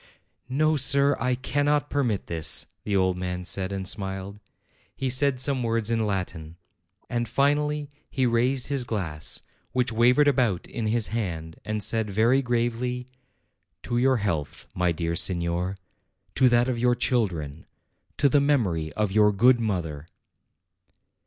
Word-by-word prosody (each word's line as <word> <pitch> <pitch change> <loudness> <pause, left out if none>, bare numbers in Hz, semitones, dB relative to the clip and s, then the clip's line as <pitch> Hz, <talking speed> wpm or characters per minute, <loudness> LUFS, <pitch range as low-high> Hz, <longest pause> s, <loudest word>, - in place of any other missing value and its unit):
"No, 155 +4 +2
sir; 140 +1 +4
I 125 +1 0
cannot 145 +3 0
permit 120 -8 0
this," 80 -2 0 0.2
the 105 - -1
old 95 -1 +2
man 90 0 -4
said, 95 +1 -1
and 95 -1 -3
smiled. 95 +1 -3 0.6
He 130 -1 -2
said 130 0 +2
some 130 0 +2
words 115 -1 0
in 115 -2 +1
Latin. 90 -5 -4 0.5
And, 120 -2 -2
finally, 145 +3 +1 0.2
he 130 -2 0
raised 125 +2 +1
his 140 -3 0
glass, 90 -10 -3 0.3
which 125 -1 +1
wavered 125 +6 +4
about 120 -10 +1
in 115 -2 -4
his 115 0 0
hand, 85 -8 -4
and 110 -1 -1
said 110 +1 +3
very 115 +7 +3
gravely. 125 0 -2 0.7
"To 120 0 -1
your 130 +1 +3
health, 85 -9 -3
my 90 -1 +1
dear 85 0 -2
signer, 85 +2 -1 0.6
to 130 -1 +4
that 120 +1 +3
of 125 -2 -2
your 120 0 +3
children, 90 - -1 0.5
to 145 - +4
the 140 +1 +3
memory 100 - 0
of 105 -2 -1
your 105 +1 +4
good 120 +5 +4
mother!" 85 -9 -3
115 Hz, 145 wpm, -25 LUFS, 95-130 Hz, 0.7 s, sir